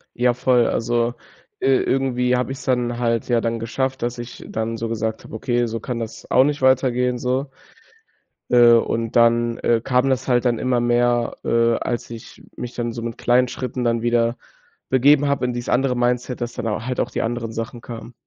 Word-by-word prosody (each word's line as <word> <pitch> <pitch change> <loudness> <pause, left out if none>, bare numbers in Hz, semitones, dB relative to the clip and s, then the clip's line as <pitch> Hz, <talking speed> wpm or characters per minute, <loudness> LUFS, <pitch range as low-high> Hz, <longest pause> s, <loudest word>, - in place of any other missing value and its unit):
Ja, 125 0 +2
voll. 125 -1 +3
Also, 120 0 0 0.5
äh, 135 - +2
irgendwie 125 -1 +1
habe 125 +1 -1
ich‘s 135 - -7
dann 125 -2 0
halt 115 -2 0
ja 120 -1 +2
dann 115 0 -2
geschafft, 130 +3 -2
dass 120 +1 -2
ich 120 0 -8
dann 110 +1 -3
so 115 0 -3
gesagt 110 -1 -3
habe: - - -10
„Okay, 120 +2 0
so 115 0 -4
kann 120 +1 -4
das 115 -1 -7
auch 130 - +6
nicht 145 0 -1
weitergehen“, 125 -1 +2
so. 130 +3 -1 1.0
Äh, 120 -1 +7
und 115 0 0
dann, 115 0 +3
äh, 115 -1 +2
kam 125 +1 +2
das 130 -1 -1
halt 125 -1 +2
dann 120 -2 +1
immer 125 -1 +1
mehr, 120 0 +1
äh, 115 0 +2
als 120 - -3
ich 115 -1 -11
mich 125 0 -6
dann 120 -1 -3
so 115 - -6
mit 115 -1 -5
kleinen 125 +1 +3
Schritten 125 0 -4
dann 115 -1 +1
wieder 120 0 +1 0.5
begeben 140 +3 +4
habe 140 -2 0
in 125 - -1
dies 120 0 -5
andere 125 0 +2
Mindset, 125 +1 -1
dass 120 0 -3
dann 120 -2 -4
au 105 -1 -2
halt 125 0 -3
auch 120 - -1
die - - -2
anderen 115 -1 -3
Sachen 115 +1 -6
kamen. 115 0 -9
120 Hz, 205 wpm, -21 LUFS, 115-125 Hz, 1.0 s, Äh